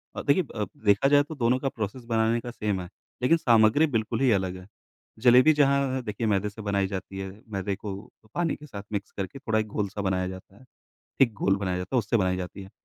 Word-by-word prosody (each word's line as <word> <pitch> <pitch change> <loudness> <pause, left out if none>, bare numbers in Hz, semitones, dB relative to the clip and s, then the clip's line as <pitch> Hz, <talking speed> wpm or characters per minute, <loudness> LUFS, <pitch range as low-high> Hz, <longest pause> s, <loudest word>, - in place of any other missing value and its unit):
और - - -4
देखिए 145 +6 +4
अ, 105 - -1
ब 95 - -6 0.2
देखा 100 +6 +4
जाए 145 0 +5
तो 155 +2 -8
दोनों 125 -1 +2
का 135 - -1
प्रोसेस 110 +2 -5
बनाने 115 +1 +2
का 120 - -6
सेम 105 -5 -2
है, 90 - -8 0.3
लेकिन 165 +7 +4
सामग्री 115 +4 +4
बिल्कुल 110 +2 0
ही 130 - +4
अलग 95 -3 0
है, 95 +1 -12 0.5
जलेबी 125 +6 +6
जहाँ 140 -2 +2
देखिए 110 0 -3
मैदे 105 0 +1
से 110 +2 -10
बनाई 100 -1 0
जाती 95 0 -6
है, 95 0 -4 0.2
मैदे 100 -1 -2
को 100 -1 -6 0.4
पानी 170 -2 0
के 150 - -13
साथ 100 -8 -8
मिक्स 100 -1 -4
करके 95 +7 -4
थोड़ा 110 -4 0
एक 110 - -2
गोल 105 -1 -2
सा 100 +1 -5
बनाया 95 -2 0
जाता 95 +1 -10
है, 130 - -18 0.6
थिक 120 -5 +5
गोल 95 0 +3
बनाया 95 -2 -2
जाता 90 +8 -3
है, - - +5
उससे 115 +1 +1
बनाई 90 -3 +1
जाती 90 +2 -6
है 95 - -12
105 Hz, 240 wpm, -26 LUFS, 95-125 Hz, 0.6 s, जलेबी